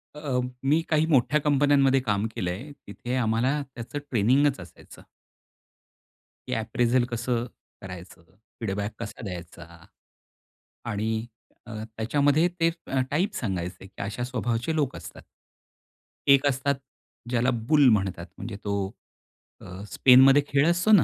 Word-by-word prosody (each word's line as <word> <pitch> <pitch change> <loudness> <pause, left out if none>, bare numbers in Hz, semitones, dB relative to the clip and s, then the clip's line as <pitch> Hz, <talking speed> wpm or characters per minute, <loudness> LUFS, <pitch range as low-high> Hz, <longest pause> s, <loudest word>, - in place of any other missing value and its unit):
अ, 145 -4 -2 0.2
मी 150 +4 +3
काही 155 0 +3
मोठ्या 150 0 +3
कंपन्यांमध्ये 140 -2 +3
काम 105 -4 0
केलंय. 95 +11 -4 0.2
तिथे 120 +5 -5
आम्हाला 125 +4 +1
त्याचं 120 +4 -5
ट्रेनिंगच 130 +4 +3
असायचं. 90 -2 -13 1.5
की - - -2
अप्रिझल 120 +2 +1
कसं 120 0 -1 0.4
करायचं? 90 -2 -10 0.4
फीडबॅक 100 0 -2
कसा 115 +1 -7
द्यायचा? 85 -3 -8 1.2
आणि 110 0 -2 0.4
अ, 120 - -10 0.3
त्याच्यामध्ये 145 +8 +2
ते 165 0 +4 0.2
अ, 135 - 0
टाइप 185 +8 0
सांगायचे 90 -4 -4
की 95 - -10
अशा 105 +4 -4
स्वभावाचे 120 +3 -2
लोक 145 -4 0
असतात. - - -10 1.1
एक 140 0 +6
असतात 140 +1 +1 0.5
ज्याला 125 +1 +2 0.2
बुल 145 -2 +5
म्हणतात. 95 -5 0
म्हणजे 115 - -6
तो 100 -1 -1 0.7
अ, 90 +2 -9
स्पेनमध्ये 135 +5 +7
खेळ 140 +2 +3
असतो 175 +5 +2
ना. 205 -7 +7
120 Hz, 125 wpm, -26 LUFS, 105-140 Hz, 1.5 s, स्पेनमध्ये